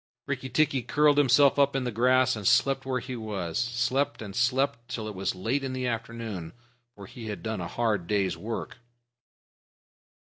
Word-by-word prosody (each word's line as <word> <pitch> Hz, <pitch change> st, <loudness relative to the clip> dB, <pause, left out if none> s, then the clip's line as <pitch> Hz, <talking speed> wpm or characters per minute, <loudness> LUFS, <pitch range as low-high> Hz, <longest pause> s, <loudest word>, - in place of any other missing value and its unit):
Rikki 130 Hz, -, -4 dB
tikki 145 Hz, -2 st, +2 dB
curled 145 Hz, +3 st, +3 dB
himself 140 Hz, +1 st, +5 dB
up 140 Hz, -1 st, +3 dB
in 135 Hz, -, 0 dB
the 125 Hz, -, -2 dB
grass 130 Hz, +3 st, +3 dB
and 105 Hz, -3 st, -3 dB
slept 135 Hz, 0 st, +3 dB
where 130 Hz, -1 st, 0 dB
he 125 Hz, +1 st, -6 dB
was 105 Hz, -5 st, -3 dB
slept 125 Hz, +2 st, 0 dB
and 100 Hz, -2 st, -8 dB
slept 125 Hz, -1 st, 0 dB
till 110 Hz, -2 st, -4 dB
it 105 Hz, -, -5 dB
was 95 Hz, -1 st, -2 dB
late 115 Hz, +10 st, -1 dB
in 130 Hz, -1 st, -3 dB
the 130 Hz, 0 st, -3 dB
afternoon, 115 Hz, -7 st, -4 dB, 0.4 s
for 100 Hz, -, -10 dB
he 115 Hz, +3 st, -9 dB
had 105 Hz, -2 st, -6 dB
done 110 Hz, -4 st, -3 dB
a 85 Hz, -, -4 dB
hard 105 Hz, -6 st, -1 dB
day's 100 Hz, -5 st, +1 dB
work. 115 Hz, +7 st, -5 dB
120 Hz, 180 wpm, -27 LUFS, 105-130 Hz, 0.4 s, himself